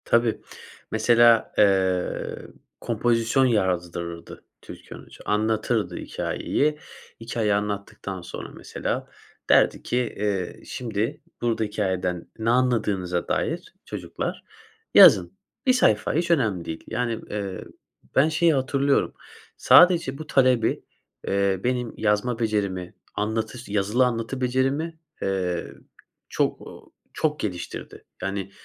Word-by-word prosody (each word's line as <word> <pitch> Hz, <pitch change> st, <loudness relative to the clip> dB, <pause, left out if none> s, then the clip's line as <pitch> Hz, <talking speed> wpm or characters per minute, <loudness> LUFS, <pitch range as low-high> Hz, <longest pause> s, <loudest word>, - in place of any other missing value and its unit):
Tabii. 115 Hz, -1 st, +2 dB, 0.5 s
Mesela, 115 Hz, +1 st, +4 dB
eee, 95 Hz, -3 st, +2 dB, 0.4 s
kompozisyon 120 Hz, +3 st, +2 dB
yazdırırdı 85 Hz, -6 st, -2 dB, 0.2 s
Türkan -, -, -11 dB
Hoca. -, -, -15 dB
Anlatırdı 110 Hz, +1 st, 0 dB
hikâyeyi. 150 Hz, +1 st, -1 dB, 0.4 s
Hikâye 115 Hz, -2 st, -1 dB
anlattıktan 100 Hz, -2 st, -3 dB
sonra, 85 Hz, -, -8 dB
mesela, -, -, -4 dB, 0.4 s
derdi -, -, +4 dB
ki, 125 Hz, -, -1 dB, 0.2 s
eee, 100 Hz, -3 st, -2 dB
"Şimdi 115 Hz, -2 st, -3 dB, 0.2 s
burada 115 Hz, -2 st, 0 dB
hikâyeden 95 Hz, -4 st, -2 dB
ne 110 Hz, +1 st, 0 dB
anladığınıza 105 Hz, -8 st, +1 dB
dair -, -, -2 dB
çocuklar -, -, -5 dB, 0.5 s
yazın." 90 Hz, -1 st, +8 dB, 0.3 s
1 255 Hz, -, +5 dB
sayfa 110 Hz, -, +2 dB
hiç 170 Hz, +3 st, 0 dB
önemli 110 Hz, -, +1 dB
değil, 80 Hz, -1 st, -6 dB
yani, 115 Hz, -1 st, -2 dB
ııı, 100 Hz, -3 st, -4 dB, 0.5 s
ben 145 Hz, +4 st, +5 dB
şeyi 165 Hz, +1 st, +3 dB
hatırlıyorum. 140 Hz, +1 st, +1 dB, 0.4 s
Sadece 170 Hz, -7 st, +6 dB
bu 155 Hz, +1 st, -8 dB
talebi, 130 Hz, -4 st, +2 dB, 0.4 s
eee, 100 Hz, -1 st, +1 dB
benim 125 Hz, -1 st, -1 dB
yazma 110 Hz, +3 st, 0 dB
becerimi, 100 Hz, -5 st, -1 dB, 0.2 s
anlatı 110 Hz, +3 st, -2 dB
yazılı 105 Hz, +5 st, +2 dB
anlatı 120 Hz, +2 st, -2 dB
becerimi, 135 Hz, +6 st, 0 dB, 0.2 s
eee, 90 Hz, -3 st, -1 dB, 0.6 s
çok, -, -, 0 dB
ııı, -, -, -11 dB, 0.3 s
çok 150 Hz, -1 st, -1 dB
geliştirdi. 90 Hz, -5 st, -6 dB, 0.2 s
Yani, 95 Hz, 0 st, -3 dB
110 Hz, 105 wpm, -24 LUFS, 95-125 Hz, 0.6 s, yazın